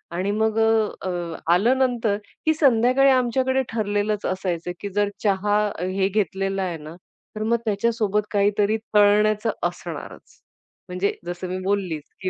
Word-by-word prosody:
आणि 190 +3 -1
मग 220 0 +1
अ, 220 -3 +1
अ, 175 -2 -4 0.2
आलं 235 +9 +3
नंतर 235 -5 +1 0.3
की 315 - +4
संध्याकाळी 270 -2 +4
आमच्याकडे 260 +1 +2
ठरलेलंच 210 -1 -1
असायचं 180 -2 -2
की 200 - -5
जर 205 0 +2
चहा, 205 +1 +2
अ, 180 - -6
हे 190 +1 0
घेतलेला 195 -1 -1
आहे 175 -3 -3
ना, 155 +2 -10 0.4
तर 215 - -3
मग 235 +2 +2
त्याच्यासोबत 210 0 +1
काहीतरी 205 +1 +2 0.2
तळण्याचं 210 +2 +4
असणारच. - - -6 0.5
म्हणजे 180 +2 -1
जसं 175 +1 -5
मी 185 - -3
बोललीच, 185 -6 -1 0.2
की 185 - -1
205 Hz, 145 wpm, -23 LUFS, 190-225 Hz, 0.5 s, की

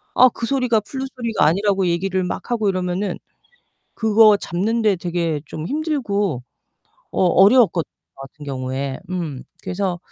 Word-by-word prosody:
아 255 - +8
그 235 - -5
소리가 250 -4 +1
플룻 265 +5 -5
소리가 230 -4 0
아니라고 195 +2 +2
얘기를 185 +2 0
막 180 - -5
하고 220 -4 +1
이러면은 185 0 -2 0.8
그거 220 -1 +5
잡는데 210 +4 0
되게 170 -3 -2
좀 155 +2 -6
힘들고 235 - -1 0.7
어 - - +2
어려웠거든요 190 -1 +4 0.3
저 - - -15
같은 140 +2 -12
경우에. 130 0 -4
음 160 -8 -4 0.2
그래서 180 -1 -2
195 Hz, 310 characters per minute, -21 LUFS, 170-225 Hz, 0.8 s, 아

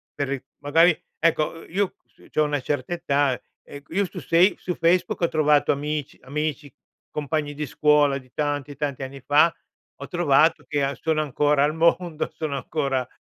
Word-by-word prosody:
per 140 - -2
ri 135 -2 -3 0.2
magari, 165 +4 +4 0.2
ecco, 165 0 +1
i - - -18
io 200 -1 +1
s - - -22
c'ho 155 - +2
una 145 -1 -1
certa 145 +3 -2
età, 145 -6 +1 0.2
e 145 0 -11
q - - -36
io 200 +2 +2
su 180 - -8
sei 175 +4 +3
su 180 - -3
Facebook 175 +2 +1
ho 170 - +4
trovato 150 -2 +3
amici 150 0 -3
amici, 150 0 -3 0.4
compagni 150 0 -2
di 150 0 -4
scuola 145 0 +3
di 130 -2 -14
tanti 145 -1 -2
tanti 140 -2 -3
anni 135 +1 -8
fa, 150 +5 +4 0.5
ho - - -6
trovato 165 -3 +3
che 145 -2 0
a 135 +1 -1
sono 160 -1 0
ancora 145 0 +2
al 150 +2 +1
mondo, 170 0 +1
sono 155 -2 -3
ancora 135 -1 -2
150 Hz, 180 wpm, -24 LUFS, 140-160 Hz, 0.5 s, magari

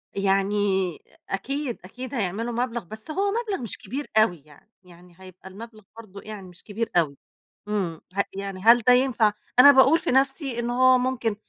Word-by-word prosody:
يعني، 195 +1 +1 0.7
أكيد، 265 +6 -3
أكيد 250 +7 -9
هيعملوا 225 +1 -2
مبلغ. 240 -1 -2
بس 215 - -10
هو 395 +4 0
مبلغ 435 - -3
مش 230 - -5
كبير 285 +3 -7
أوي، 175 -9 +2
يعني 150 +7 -21
يعني 175 -1 -18
هيبقى 185 0 -13
المبلغ 215 +2 -12
برضه 200 -3 -11
يعني 210 -3 -9
مش 180 0 -17
كبير 225 +2 -4
أوي، 150 -5 +1 0.5
إمم 185 -6 -3
ه 200 - +3
يعني 195 -1 -6
هل 230 +4 +6
ده 250 +3 +5
ينفع؟ 250 -4 +3 0.3
أنا 285 +2 +10
باقول 270 +4 +5
في - - -2
نفسي 270 -1 0
إن 235 - -2
هو 255 +1 +4
ممكن 250 -4 -1
225 Hz, 170 wpm, -24 LUFS, 195-255 Hz, 0.7 s, أنا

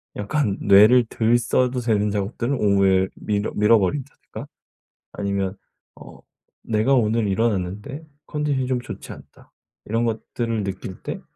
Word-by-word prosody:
약간 105 -1 -1
뇌를 105 +5 +6
덜 115 +1 +2
써도 125 +2 0
되는 105 -3 +1
작업들은 110 +6 -2
오후에 100 -4 +3
미뤄 105 0 -2
미뤄 105 +2 +5
버린다든가 115 +8 -4 0.7
아니면 100 -1 -2 0.4
어 - - -13 0.4
'내가 110 +4 +1
오늘 115 -2 +1
일어났는데 105 - -2 0.2
컨디션이 145 -4 -1
좀 130 -1 0
좋지 - - -9
않다.' - - -15 0.3
이런 115 +2 0
것들을 115 0 -3
느낄 95 -1 -6
때 - - -5
110 Hz, 290 characters per minute, -22 LUFS, 100-120 Hz, 0.7 s, 뇌를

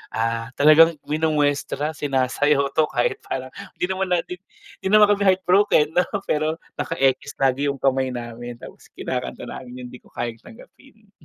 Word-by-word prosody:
ah, 115 +1 -1
talagang 155 +3 +6
minumwestra, 150 -1 0
sinasayaw 140 0 +1
'to. 155 -1 +2
Kahit 120 -1 -1
parang 130 0 -4 0.2
hindi - - -1
naman 190 0 -1
natin 180 - -1 0.4
hindi - - -2
naman 210 -1 +6
kami 200 -1 0
heart 185 0 +3
broken, 180 -5 +3
'no? 180 - +3 0.2
Pero 155 +1 0 0.2
naka-ekis 140 -3 0
lagi 135 +1 +1
'yong 140 - -3
kamay 135 0 +1
namin. 120 0 -7
Tapos - - -13
kinakanta - - -4
namin 125 -1 -9
'yong, - - -9
"Di 125 - -11
Ko - - -23
Kayang 120 -1 -5
Tanggapin." 225 -2 -18
145 Hz, 160 wpm, -22 LUFS, 130-165 Hz, 0.4 s, talagang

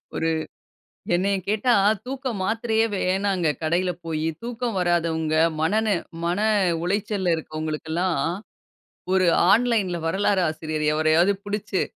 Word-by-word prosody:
ஒரு 165 - 0 0.9
என்னைய 195 +2 +1
கேட்டா, 225 +4 +2 0.3
தூக்க 265 +1 -5
மாத்திரையே 225 +2 +1
வேண்ணாங்க. 190 -2 0 0.2
கடையில 175 +3 +1
போயி 160 -1 -2 0.2
தூக்கம் 235 -2 -3
வராதவங்க, 165 -3 0 0.3
மன 210 +7 +2
நெ 200 - +3 0.3
மன 175 +3 0 0.4
உளைச்சல்ல 195 -1 0
இருக்கவங்களுக்கெல்லாம், 160 +3 -2 0.9
ஒரு 185 -1 +3 0.3
ஆன்லைன்‌ல 210 -6 +2
வரலாறு 190 +2 +1
ஆசிரியர் 155 -1 -3
எவரயாவது 160 +5 +3
புடிச்சி. 205 -1 -2
185 Hz, 105 wpm, -24 LUFS, 165-210 Hz, 0.9 s, நெ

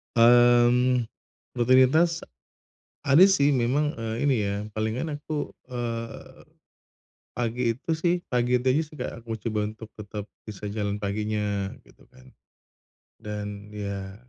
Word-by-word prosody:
Mmm, 120 +1 +5 0.5
rutinitas 130 +8 +4 0.9
ada 145 +7 +7
sih 145 -8 +4
memang, 140 +5 +1
eee, 115 -1 -4
ini 135 - +3
ya 100 0 -1 0.2
palingan 120 +8 -2
aku, 150 0 -4 0.2
eee, 115 -2 -5 0.9
pagi 120 +1 -2
itu 130 +7 -6
sih 175 +2 +2 0.2
pagi 125 0 +2
itu 130 - -3
aja 145 +5 +3
sih, 150 - -15
Kak, - - -3
aku 115 - -4 0.2
coba 105 -1 -1
untuk 110 0 -11
tetap 105 0 -7 0.2
bisa 105 -1 -6
jalan 105 0 -3
paginya 105 -1 -2
gitu - - -22
kan, 65 0 -19 0.9
dan, 105 -1 -6
ya 100 -2 -5
120 Hz, 125 wpm, -26 LUFS, 105-130 Hz, 0.9 s, ada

